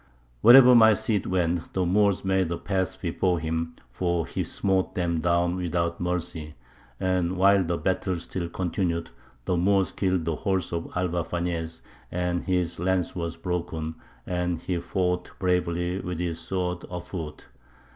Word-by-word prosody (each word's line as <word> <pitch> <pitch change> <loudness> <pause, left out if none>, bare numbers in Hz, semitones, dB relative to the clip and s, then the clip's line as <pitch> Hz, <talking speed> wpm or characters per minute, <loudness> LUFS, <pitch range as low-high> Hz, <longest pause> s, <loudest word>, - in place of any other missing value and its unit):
Wherever 125 +1 +9
my 110 -2 +7
Cid 105 0 -1
went, 85 -2 -1
the 95 -1 +1
Moors 100 +1 +2
made 95 -3 +1
a 85 - -1
path 95 -2 -2
before 90 0 0
him, 80 +1 -3 0.2
for 85 +4 0
he - - -3
smote 95 -1 -1
them 85 -2 0
down 85 +1 +1
without 85 -1 -1
mercy. 85 -3 -3 0.4
And 95 -1 0
while 100 +1 +5
the 85 0 -1
battle 95 0 0
still 85 +1 -4
continued, 85 -2 -2 0.3
the 90 - +1
Moors 95 +2 +2
killed 95 -4 0
the 80 -2 -1
horse 95 -4 -1
of 85 -1 -3
Alvar 90 -1 0
Fañez, 85 -2 -3 0.3
and 90 0 -1
his 90 -3 -1
lance 90 0 0
was 85 -2 -3
broken, 85 -2 -3 0.3
and 90 -1 -1
he 90 -2 -2
fought 90 +1 -1
bravely 90 0 0
with 90 -3 -4
his 85 -1 -2
sword 90 +1 -3
afoot. 85 -3 -6
90 Hz, 150 wpm, -26 LUFS, 85-95 Hz, 0.4 s, Wherever